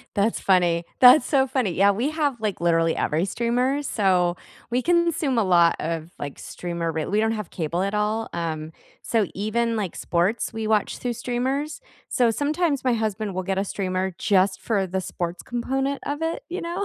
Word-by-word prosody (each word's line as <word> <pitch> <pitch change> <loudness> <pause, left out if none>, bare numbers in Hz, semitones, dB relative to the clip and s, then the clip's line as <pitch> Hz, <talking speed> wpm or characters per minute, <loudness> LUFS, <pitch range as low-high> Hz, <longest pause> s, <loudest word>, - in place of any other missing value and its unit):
That's 205 +3 +1
funny, 175 -3 +2 0.2
that's 255 +4 +8
so 270 -3 +3
funny, 255 -7 0
yeah, 200 +3 +4
we 235 +8 -1
have, 295 -5 -1
like, 210 -3 -2
literally 165 -1 +2
every 160 +4 0
streamer, 250 +7 0
so 185 -8 +2 0.4
we 250 +1 +1
consume 335 -5 +1
a 225 - +4
lot 170 -2 +4
of, 165 0 -3
like, 145 -1 -6
streamer 170 -1 -4
re 160 -1 -2
we 210 - 0
don't 220 +1 +2
have 210 -4 -5
cable 170 +2 -2
at 200 +1 -2
all, 210 +2 0
um, 160 -2 -3 0.3
so 220 -4 +1
even, 230 +3 0
like, 200 -6 -3
sports, 180 +7 0
we 225 -1 -4
watch 215 -2 +1
through 245 -1 -2
streamers, 260 - -2 0.3
so 240 -3 +3
sometimes 295 +3 0
my 255 -2 +2
husband 215 -3 -2
will 185 - -2
get 190 +1 -1
a - - +1
streamer 185 -2 -2
just 190 -1 +2
for 200 -4 0
the 190 +1 -2
sports 175 -1 -4
component 270 +3 -2
of 290 +2 -3
it, 330 +9 -2
you 360 +3 -4
know? 345 +4 -3
215 Hz, 190 wpm, -24 LUFS, 180-255 Hz, 0.4 s, that's